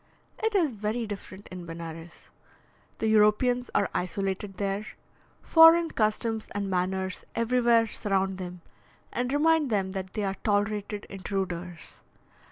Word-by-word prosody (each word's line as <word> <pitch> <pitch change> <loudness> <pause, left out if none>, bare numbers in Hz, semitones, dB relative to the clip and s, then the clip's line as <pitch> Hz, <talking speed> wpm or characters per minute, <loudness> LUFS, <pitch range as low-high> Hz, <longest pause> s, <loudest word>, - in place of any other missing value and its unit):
It 440 -1 0
is 335 -8 +3
very 220 +2 -2
different 200 -1 -8
in 180 -2 -8
Benares. 165 0 -9 0.7
The - - -2
Europeans 220 +4 +3
are 200 - +3
isolated 195 +2 -2
there; 200 0 -1 0.6
foreign 325 0 +7
customs 220 0 0
and 200 -1 -1
manners 185 +1 -1
everywhere 235 0 +3
surround 195 -3 -1
them, 180 -1 -7 0.5
and 245 +1 -1
remind 310 0 +3
them 195 -4 0
that 190 -1 -5
they 210 - -1
are 195 -1 -2
tolerated 205 0 0
intruders. 185 -3 -5
205 Hz, 125 wpm, -28 LUFS, 190-230 Hz, 0.7 s, foreign